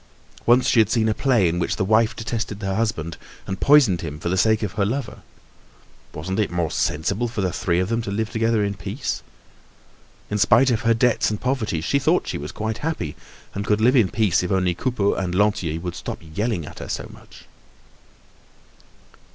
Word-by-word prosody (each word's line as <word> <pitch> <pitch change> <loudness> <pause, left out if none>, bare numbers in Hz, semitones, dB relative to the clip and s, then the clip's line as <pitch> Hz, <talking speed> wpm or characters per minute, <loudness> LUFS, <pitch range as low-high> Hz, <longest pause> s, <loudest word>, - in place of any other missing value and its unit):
Once 125 +2 +5
she 120 - +4
had 110 -2 +4
seen 110 -1 +2
a 110 - +2
play 120 -6 +2
in 85 +1 -1
which 85 - -1
the 95 - -1
wife 110 +2 +3
detested 110 -2 -4
her 95 0 -1
husband 95 -7 -2 0.3
and 95 -1 -4
poisoned 135 - +5
him 75 -3 -5
for 85 - -3
the 95 - +1
sake 110 +3 +2
of 105 - -2
her 105 +1 -1
lover. 110 -1 -3 0.9
Wasn't 95 +6 -4
it 105 - +1
more 85 -3 -1
sensible 100 +10 0
for 115 -2 -4
the 90 -2 -1
three 85 -2 0
of 95 +2 -1
them 115 0 0
to 110 - -5
live 110 +3 -2
together 115 -2 +1
in 100 0 -1
peace? - - -4 1.1
In 105 - 0
spite 120 +6 +5
of 115 - 0
her 115 -1 +3
debts 120 0 +2
and 105 -1 -3
poverty 110 - -1
she 140 - +1
thought 135 - +2
she - - -3
was 75 +3 -6
quite 110 +2 -4
happy 155 - -3 0.4
and 100 - -3
could 105 0 +1
live 125 +5 +4
in 110 -8 +4
peace 105 -1 +2
if 90 - -3
only 90 -2 +2
Coupeau 105 +1 0
and 90 -2 -2
Lantier 95 -5 +1
would 90 0 -5
stop - - -6 0.2
yelling 105 -4 -1
at - - -10
her - - -7
so - - -4
much. - - -16
105 Hz, 205 wpm, -22 LUFS, 90-115 Hz, 1.1 s, Once